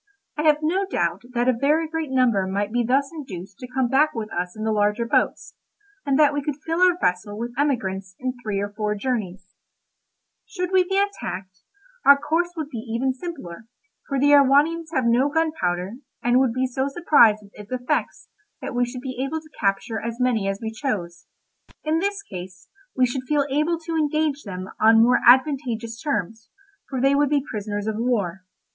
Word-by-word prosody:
I 300 Hz, -, -2 dB
have 300 Hz, 0 st, +3 dB
no 375 Hz, +5 st, +1 dB
doubt 175 Hz, -, -1 dB
that 240 Hz, +1 st, +1 dB
a 255 Hz, -, +5 dB
very 300 Hz, +7 st, +1 dB
great 320 Hz, -2 st, -3 dB
number 240 Hz, -7 st, +2 dB
might 200 Hz, +2 st, -2 dB
be 240 Hz, +1 st, +1 dB
thus 270 Hz, +4 st, +1 dB
induced 195 Hz, -, -8 dB
to 250 Hz, -, -7 dB
come 255 Hz, 0 st, 0 dB
back 295 Hz, +5 st, +2 dB
with 220 Hz, -1 st, -4 dB
us 180 Hz, +2 st, -3 dB
in 215 Hz, -, -5 dB
the 220 Hz, -, 0 dB
larger 210 Hz, +2 st, +1 dB
boats, -, -, 0 dB, 0.5 s
and 275 Hz, -1 st, +3 dB
that 295 Hz, -2 st, +5 dB
we 290 Hz, -, -1 dB
could 285 Hz, 0 st, -3 dB
fill 330 Hz, +2 st, -1 dB
our 365 Hz, -1 st, +5 dB
vessel 180 Hz, +3 st, -1 dB
with 235 Hz, +2 st, -5 dB
emigrants 195 Hz, -10 st, -1 dB
in 255 Hz, 0 st, -3 dB
three 210 Hz, -3 st, -2 dB
or 205 Hz, 0 st, -4 dB
four 210 Hz, -1 st, -1 dB
journeys. 200 Hz, -5 st, -4 dB, 0.9 s
Should 360 Hz, -1 st, -4 dB
we 375 Hz, -1 st, +5 dB
be 385 Hz, +2 st, -2 dB
attacked, 195 Hz, -, -3 dB, 0.4 s
our 280 Hz, 0 st, +8 dB
course 340 Hz, +4 st, -1 dB
would 310 Hz, -2 st, -4 dB
be 235 Hz, -, -5 dB
even 235 Hz, +3 st, -1 dB
simpler, 255 Hz, -, -8 dB, 0.4 s
for 275 Hz, -, -1 dB
the 290 Hz, +2 st, +4 dB
Erewhonians 290 Hz, +4 st, +4 dB
have 260 Hz, -7 st, 0 dB
no 245 Hz, +4 st, +3 dB
gunpowder, 235 Hz, -, -1 dB, 0.3 s
and 245 Hz, +1 st, +4 dB
would 260 Hz, -3 st, +2 dB
be 255 Hz, +1 st, 0 dB
so 260 Hz, +1 st, -1 dB
surprised 275 Hz, -9 st, +4 dB
with 200 Hz, -, -17 dB
its 210 Hz, +2 st, -12 dB
effects 250 Hz, -1 st, -2 dB, 0.3 s
that -, -, -6 dB
we 245 Hz, 0 st, +2 dB
should 245 Hz, +1 st, -7 dB
be 255 Hz, -1 st, -4 dB
able 305 Hz, +4 st, -2 dB
to 310 Hz, -1 st, -19 dB
capture 200 Hz, +2 st, 0 dB
as 235 Hz, +1 st, -5 dB
many 240 Hz, -5 st, +1 dB
as 195 Hz, 0 st, -2 dB
we 220 Hz, -1 st, -4 dB
chose; 190 Hz, -8 st, -4 dB, 0.6 s
in 310 Hz, +1 st, +1 dB
this 400 Hz, +2 st, -2 dB
case 185 Hz, -, -10 dB, 0.3 s
we 255 Hz, -, +4 dB
should 255 Hz, +1 st, -3 dB
feel 295 Hz, -2 st, +2 dB
able 305 Hz, +4 st, +1 dB
to 330 Hz, 0 st, -4 dB
engage 305 Hz, -2 st, 0 dB
them 185 Hz, -2 st, -6 dB
on 225 Hz, +1 st, +6 dB
more 245 Hz, +2 st, +4 dB
advantageous 245 Hz, -3 st, +3 dB
terms, 220 Hz, -, -3 dB, 0.4 s
for 265 Hz, -, -3 dB
they 270 Hz, +2 st, +3 dB
would 285 Hz, 0 st, +3 dB
be 285 Hz, -2 st, +1 dB
prisoners 205 Hz, -1 st, -4 dB
of 215 Hz, -1 st, -2 dB
war. 205 Hz, -7 st, -1 dB
250 Hz, 195 wpm, -23 LUFS, 210-290 Hz, 0.9 s, our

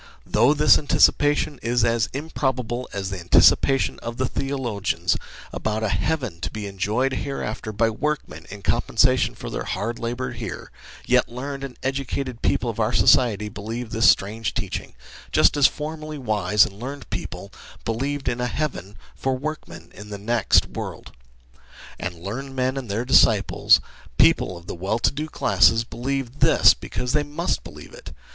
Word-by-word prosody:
Though 120 Hz, +7 st, +3 dB
this 150 Hz, +1 st, +5 dB
anticipation 145 Hz, -1 st, +2 dB
is 120 Hz, 0 st, +1 dB
as 115 Hz, -1 st, +1 dB
improbable 130 Hz, -4 st, -3 dB
as 100 Hz, -2 st, -4 dB
the 95 Hz, -, -4 dB
anticipation 130 Hz, +9 st, +4 dB
of 115 Hz, 0 st, -6 dB
the 130 Hz, -, 0 dB
theologians 130 Hz, -8 st, -1 dB, 0.4 s
about 110 Hz, 0 st, -2 dB
a 110 Hz, -, 0 dB
heaven 130 Hz, -, -2 dB
to -, -, -2 dB
be 105 Hz, -1 st, -6 dB
enjoyed 105 Hz, +7 st, -1 dB
hereafter 125 Hz, -6 st, -4 dB
by 115 Hz, +2 st, +1 dB
workmen 110 Hz, -, -4 dB
in 100 Hz, 0 st, -10 dB
compensation -, -, +2 dB
for -, -, -7 dB
their -, -, -3 dB
hard 115 Hz, +3 st, -3 dB
labour 120 Hz, +2 st, -3 dB
here, 115 Hz, -6 st, -7 dB, 0.3 s
yet -, -, +3 dB
learned 135 Hz, +3 st, -6 dB
and 130 Hz, -3 st, -7 dB
educated 135 Hz, -2 st, -3 dB
people -, -, +1 dB
of -, -, -4 dB
our -, -, +1 dB
society 105 Hz, -5 st, +4 dB
believe 110 Hz, +3 st, -6 dB
this 115 Hz, +1 st, +5 dB
strange 105 Hz, +3 st, +1 dB
teaching, 100 Hz, -, -4 dB, 0.4 s
just -, -, +4 dB
as 145 Hz, -2 st, +6 dB
formerly 155 Hz, 0 st, -6 dB
wise 105 Hz, -5 st, +2 dB
and 100 Hz, 0 st, -10 dB
learned 135 Hz, +4 st, -7 dB
people -, -, -6 dB, 0.3 s
believed 135 Hz, +5 st, -2 dB
in 120 Hz, -, -1 dB
a 125 Hz, -, 0 dB
heaven 120 Hz, -, -4 dB, 0.2 s
for 130 Hz, -1 st, -1 dB
workmen 155 Hz, +3 st, -7 dB
in 105 Hz, +1 st, -11 dB
the 100 Hz, -, -5 dB
next 110 Hz, +1 st, +2 dB
world. -, -, -7 dB, 0.9 s
And 90 Hz, -, -4 dB
learned 120 Hz, +11 st, -6 dB
men 130 Hz, 0 st, 0 dB
and 130 Hz, -5 st, -5 dB
their 110 Hz, +5 st, -2 dB
disciples 130 Hz, -, +5 dB, 0.4 s
people 90 Hz, -, +3 dB
of 85 Hz, -, -14 dB
the -, -, -6 dB
well 95 Hz, +5 st, -2 dB
to -, -, +2 dB
do 150 Hz, +2 st, -4 dB
classes 115 Hz, -6 st, +3 dB
believe 130 Hz, +3 st, -4 dB
this -, -, +6 dB
because 125 Hz, 0 st, -5 dB
they 150 Hz, -, +3 dB
must 150 Hz, +4 st, -2 dB
believe -, -, -12 dB
it. -, -, -11 dB
120 Hz, 165 wpm, -23 LUFS, 105-135 Hz, 0.9 s, as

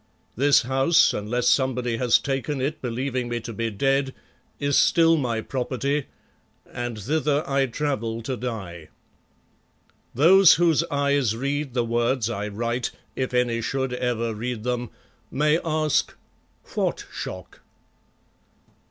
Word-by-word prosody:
This 140 Hz, +2 st, +4 dB
house, 135 Hz, +7 st, +3 dB
unless 120 Hz, +4 st, -1 dB
somebody 125 Hz, -3 st, +1 dB
has 120 Hz, 0 st, +4 dB
taken 135 Hz, +1 st, -3 dB
it 150 Hz, +4 st, -2 dB
believing 125 Hz, 0 st, -3 dB
me 120 Hz, 0 st, -2 dB
to 115 Hz, +1 st, -7 dB
be 115 Hz, +2 st, -2 dB
dead, 135 Hz, +5 st, 0 dB, 0.4 s
is 140 Hz, -1 st, 0 dB
still 165 Hz, -1 st, +5 dB
my 120 Hz, -7 st, -1 dB
property 135 Hz, +3 st, -2 dB, 0.6 s
and 120 Hz, -2 st, -5 dB
thither 150 Hz, +5 st, 0 dB
I 135 Hz, -1 st, +1 dB
travel 115 Hz, -4 st, -3 dB
to 130 Hz, +3 st, -3 dB
die. 95 Hz, -10 st, -6 dB, 1.3 s
Those 175 Hz, +6 st, +7 dB
whose 165 Hz, -2 st, +3 dB
eyes 140 Hz, -6 st, +1 dB
read 140 Hz, 0 st, -3 dB
the 120 Hz, -2 st, +1 dB
words 120 Hz, 0 st, 0 dB
I 105 Hz, -2 st, -3 dB
write, 115 Hz, +3 st, -2 dB, 0.3 s
if 130 Hz, -1 st, -2 dB
any 125 Hz, -2 st, +1 dB
should 130 Hz, +1 st, -2 dB
ever 120 Hz, -2 st, -1 dB
read 115 Hz, +1 st, -4 dB
them, 125 Hz, -1 st, -2 dB, 0.4 s
may 150 Hz, +3 st, +2 dB
ask 155 Hz, -2 st, 0 dB, 0.6 s
What -, -, -1 dB
shock? -, -, -7 dB
130 Hz, 125 wpm, -24 LUFS, 115-140 Hz, 1.3 s, Those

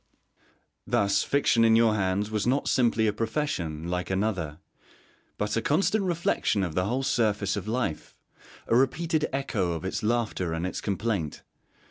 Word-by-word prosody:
Thus 100 Hz, -1 st, +2 dB
fiction 140 Hz, -4 st, +2 dB
in 115 Hz, 0 st, +5 dB
your 115 Hz, -1 st, +4 dB
hands 100 Hz, +1 st, 0 dB
was 105 Hz, +1 st, -1 dB
not 135 Hz, +3 st, +1 dB
simply 115 Hz, -3 st, +2 dB
a 105 Hz, -, +2 dB
profession, 105 Hz, -, -2 dB
like 90 Hz, +1 st, -2 dB
another, 95 Hz, -6 st, -1 dB, 0.8 s
but 105 Hz, 0 st, -1 dB
a 115 Hz, -, +1 dB
constant 195 Hz, -, +1 dB
reflection 170 Hz, -, 0 dB
of 85 Hz, -4 st, -3 dB
the 90 Hz, +3 st, 0 dB
whole 125 Hz, +6 st, -1 dB
surface 105 Hz, -6 st, +1 dB
of 100 Hz, 0 st, -5 dB
life: 115 Hz, -8 st, -3 dB, 0.5 s
a -, -, +1 dB
repeated 155 Hz, +5 st, +1 dB
echo 110 Hz, -10 st, -1 dB
of 80 Hz, +2 st, -5 dB
its 95 Hz, -, -2 dB
laughter 110 Hz, -6 st, -1 dB
and 80 Hz, +2 st, -2 dB
its 90 Hz, -, -4 dB
complaint. 100 Hz, -6 st, -2 dB
110 Hz, 155 wpm, -27 LUFS, 95-125 Hz, 0.8 s, in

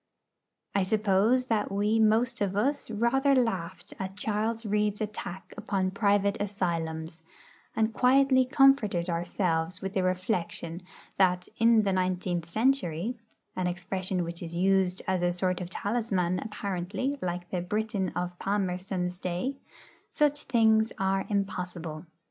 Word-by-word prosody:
I 200 Hz, -, +2 dB
suppose 215 Hz, +5 st, +2 dB
that 220 Hz, -4 st, 0 dB
we 205 Hz, +3 st, +1 dB
most 225 Hz, +2 st, +2 dB
of 195 Hz, -1 st, 0 dB
us 275 Hz, +7 st, 0 dB
rather 270 Hz, +6 st, +2 dB
laughed 185 Hz, -6 st, -1 dB
at 190 Hz, 0 st, -5 dB
Charles 220 Hz, +2 st, -1 dB
Reade's 210 Hz, 0 st, 0 dB
attack 205 Hz, -3 st, -6 dB
upon 190 Hz, -2 st, -1 dB
private 200 Hz, -1 st, +2 dB
asylums, 165 Hz, -5 st, -3 dB, 0.5 s
and 220 Hz, 0 st, +1 dB
quietly 260 Hz, +1 st, +4 dB
comforted 250 Hz, -10 st, +3 dB
ourselves 170 Hz, 0 st, -1 dB
with 195 Hz, -1 st, -5 dB
the 190 Hz, -, +1 dB
reflection 185 Hz, -2 st, -2 dB, 0.4 s
that 180 Hz, -2 st, +2 dB
'in 230 Hz, -1 st, +5 dB
the 195 Hz, -2 st, +1 dB
nineteenth 180 Hz, -2 st, -1 dB
century' 225 Hz, -, 0 dB, 0.4 s
(an 185 Hz, -1 st, -1 dB
expression 180 Hz, +1 st, -2 dB
which 170 Hz, 0 st, -6 dB
is 170 Hz, -1 st, -6 dB
used 190 Hz, 0 st, +2 dB
as 190 Hz, -1 st, +1 dB
a 175 Hz, 0 st, +2 dB
sort 180 Hz, +1 st, -1 dB
of 175 Hz, -, -5 dB
talisman, 195 Hz, -4 st, -1 dB
apparently, 205 Hz, +5 st, -3 dB
like 175 Hz, 0 st, -4 dB
the 180 Hz, -, -1 dB
'Briton' 205 Hz, 0 st, -1 dB
of 180 Hz, 0 st, -3 dB
Palmerston's 185 Hz, -2 st, -2 dB
day) 185 Hz, +11 st, -2 dB, 0.5 s
such 295 Hz, -1 st, +1 dB
things 220 Hz, -3 st, +3 dB
are 195 Hz, 0 st, 0 dB
impossible. 180 Hz, -5 st, -3 dB
195 Hz, 130 wpm, -28 LUFS, 180-220 Hz, 0.5 s, in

